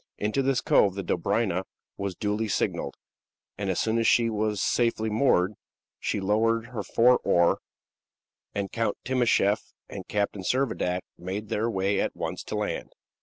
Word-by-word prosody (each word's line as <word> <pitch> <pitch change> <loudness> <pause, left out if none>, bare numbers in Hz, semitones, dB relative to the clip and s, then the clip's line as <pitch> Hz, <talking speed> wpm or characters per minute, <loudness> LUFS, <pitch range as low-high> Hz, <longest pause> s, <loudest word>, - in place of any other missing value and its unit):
Into 105 +6 0
this 135 -1 +1
cove 95 -2 +4
the 100 - -3
Dobryna 95 +1 0 0.3
was 100 -2 -4
duly 105 +2 -1
signaled, 100 - -1 0.6
and 100 -1 -3
as 95 - 0
soon 115 +1 +1
as 115 - +2
she 115 -1 +4
was 105 -1 -1
safely 115 -1 +1
moored, 105 -5 +3 0.5
she - - -1
lowered 110 +3 +2
her 120 -4 -4
four 120 +6 +4
oar, 85 0 +3 1.0
and 100 -1 -2
Count 115 -1 -1
Timascheff 120 -5 +2
and - - -8
Captain 100 -1 -1
Servadac 95 -6 0 0.2
made 100 +4 -5
their 110 +3 0
way 100 -1 0
at - - -2
once - - -4
to - - -4
land. - - -3
105 Hz, 155 wpm, -27 LUFS, 100-115 Hz, 1.0 s, cove